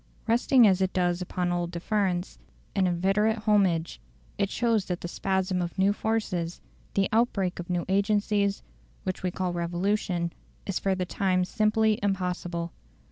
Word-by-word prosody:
Resting 240 +2 +5
as 190 -2 +4
it 190 0 +1
does 175 -1 +1
upon 180 0 -2
old 175 -1 -1
deference, 180 0 -1 0.4
and 190 -2 +3
inveterate 195 +5 +2
homage, 185 -6 +2 0.3
it 200 - 0
shows 230 -4 +1
that 180 -1 -3
the - - -4
spasm 190 0 -1
of 175 +2 -4
new 195 +1 +3
forces, 200 -6 -2 0.4
the 195 -1 +3
outbreak 210 -6 +1
of 175 - -6
new 175 -1 -1
agencies, 200 0 +1 0.4
which 185 -1 -3
we 185 - 0
call 180 0 -2
revolution, 175 0 -1 0.3
is 195 - -1
for 195 -1 +1
the 185 -1 -2
time 185 0 +1
simply 215 +1 +2
impossible. 180 -3 -2
190 Hz, 150 wpm, -27 LUFS, 175-205 Hz, 0.4 s, Resting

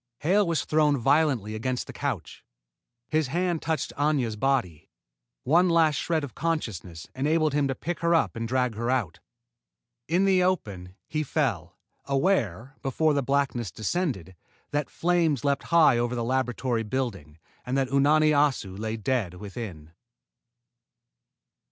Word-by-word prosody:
Hale 195 +5 +3
was 165 -2 0
thrown 150 -2 +3
violently 135 -5 +2
against 125 +3 -2
the - - -10
couch. - - -4 0.6
His 155 -2 +1
hand 175 +3 -1
touched 160 0 -2
Aña's 140 -6 0
body. 105 - -1 0.5
One 175 +6 +4
last 165 -2 +4
shred 160 -3 -1
of 140 - -6
consciousness 100 - -3
enabled 155 +2 +1
him 145 -1 +2
to 135 - -2
pick 175 +6 -4
her 170 0 +2
up 165 - +1
and 115 0 -3
drag 125 -1 0
her 115 +3 -3
out. 105 -10 -1 0.9
In 175 +5 +2
the 190 -2 +4
open, 100 - -2
he 155 - -2
fell, 150 - -2 0.3
aware, 135 - 0
before 150 +3 +1
blackness 135 -5 0
descended, 110 - -3 0.4
that 145 -1 -1
flames 165 -7 +1
leaped 140 -1 0
high 155 -8 +5
over 120 +1 -1
the 120 - -2
laboratory 125 -1 -1
building 105 - -4 0.3
and 130 +2 -2
that 135 -1 0
Unani 150 +3 +4
Assu 145 -10 +1
lay 110 +1 -3
dead 110 -5 -1
within. 95 -5 -8
135 Hz, 140 wpm, -26 LUFS, 115-155 Hz, 0.9 s, high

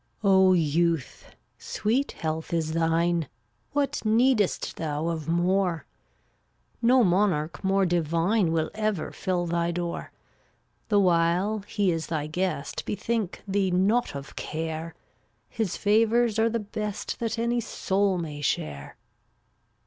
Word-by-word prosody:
394 190 -1 +5
O - - +6
youth! 165 -2 0 0.2
sweet 245 +7 -1
health 160 0 -4
is 160 -1 -1
thine; 165 0 +1 0.4
What 285 -1 0
needest 225 -1 +2
thou 155 +1 -2
of 160 -2 -4
more? 175 0 +1 1.0
No 250 +1 +5
monarch 180 -4 +1
more 195 0 +2
divine 170 +3 +1
Will 160 -1 0
ever 215 -5 -2
fill 180 -2 -1
thy 170 0 0
door. 175 0 -4 0.8
The 205 -2 +4
while 180 +3 +2
he 200 -4 +1
is 165 -1 -3
thy 155 -3 -2
guest 155 -1 -2
Bethink 215 -2 -3
thee 195 -1 +1
not 195 +3 +1
of 140 0 -8
care; 160 +1 -4 0.5
His 220 -6 -2
favors 225 +2 +3
are 225 +1 +3
the 230 0 -1
best 210 0 -4
That 230 -1 -2
any 235 +1 +1
soul 195 -2 0
may 150 -4 -5
share. 70 - -3
180 Hz, 125 wpm, -26 LUFS, 165-210 Hz, 1.0 s, O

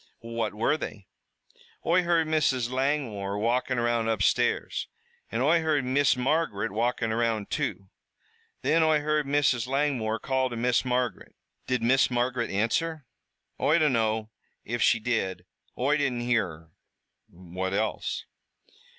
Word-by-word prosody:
"What 115 -2 -3
were 115 +8 +1
they?" 105 -9 -7 0.8
"Oi 170 +2 +4
heard 170 -2 +2
Mrs. 145 -6 +1
Langmore 130 -8 -1
walkin' 120 +4 0
around 120 -1 +1
upstairs, 110 -4 +1 0.4
an' 115 - -1
Oi 160 +5 +4
heard 150 -4 +1
Miss 130 0 +3
Margaret 125 -6 0
walkin' 115 +1 0
around, 115 -2 -1
too. 95 -1 -3 0.7
Then 165 +1 +3
Oi 155 -1 +3
heard 150 -1 0
Mrs. 135 -4 +2
Langmore 130 -5 0
call 130 +1 0
to 120 - -6
Miss 125 +1 +2
Margaret." 125 -1 -2 0.3
"Did 125 -2 0
Miss 130 +3 +4
Margaret 120 0 -1
answer?" 135 +9 -1 0.5
"Oi 155 - +3
dunno 110 -8 +1 0.3
if 120 +1 -3
she 115 - +4
did, 95 -6 -2 0.3
Oi 140 +4 +2
didn't 130 -4 -1
hear 120 -4 +1
her." 80 -1 -13 0.6
"What 90 +1 -5
else?" 110 +2 -2
125 Hz, 135 wpm, -27 LUFS, 110-145 Hz, 0.8 s, Oi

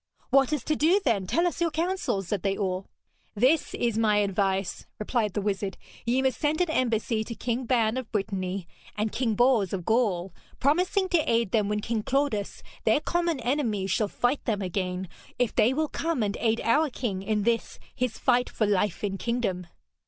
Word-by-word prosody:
'What 270 +1 +4
is 300 -5 -1
to 310 - 0
do, 330 +7 +4
then? 205 -7 +1
Tell 335 - +2
us 350 -1 -2
your 340 - +3
counsel,' 330 - -1
said 195 +1 -2
they 195 0 0
all. 190 -2 -2 0.5
'This 260 +9 +2
is 235 -2 0
my 215 -2 +3
advice,' 195 -2 0
replied 215 -2 -1
the 205 - -1
wizard. 195 -1 -2 0.3
'Ye 255 +3 +2
must 265 -1 0
send 300 0 +1
an 355 -3 +1
embassy 230 -4 0
to 230 +1 -7
King 240 +3 -2
Ban 230 -1 +2
of 255 -4 -5
Brittany 195 -3 -2 0.3
and 215 0 0
King 230 -4 0
Bors 240 -5 +3
of 180 -3 -3
Gaul, 195 -6 +1 0.3
promising 360 +7 +2
to 325 -9 +2
aid 230 -4 +2
them 210 -3 +2
when 210 0 0
King 225 0 -1
Claudas, 265 -5 -1 0.2
their 220 +6 +4
common 340 -1 0
enemy, 235 -6 0
shall 195 +3 +1
fight 245 +7 0
them 210 -4 0
again, 185 0 -2 0.3
if 245 -2 +1
they 230 - +4
will 310 +3 0
come 325 -5 -1
and 205 -1 -1
aid 225 0 +1
our 295 +7 +3
king 220 -7 -3
in 210 +1 0
this 230 +1 0 0.2
his 250 -3 -2
fight 245 -1 +2
for 220 - 0
life 205 -2 0
and 195 -1 -2
kingdom.' 225 -7 -2
225 Hz, 190 wpm, -27 LUFS, 200-265 Hz, 0.5 s, What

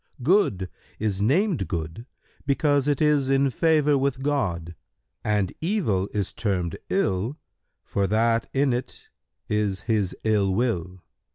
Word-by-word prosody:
Good 130 - +2 0.3
is 100 -2 -1
named 150 - +2
good, 85 +7 -5 0.4
because 145 0 +2
it 145 +1 +2
is 145 -3 +3
in 135 0 +3
favour 150 0 +3
with 135 -1 -1
God, 90 - -1 0.5
and 105 -3 0
evil 155 - 0
is 100 -3 -2
termed 90 -6 -1
ill, 115 - 0 0.5
for 100 -1 -1
that 115 +3 +1
in 135 -1 +2
it 125 +1 -5 0.4
is 105 -3 0
His 105 -5 0
ill 100 -3 +2
will. 95 -6 -1
115 Hz, 125 wpm, -25 LUFS, 95-140 Hz, 0.5 s, is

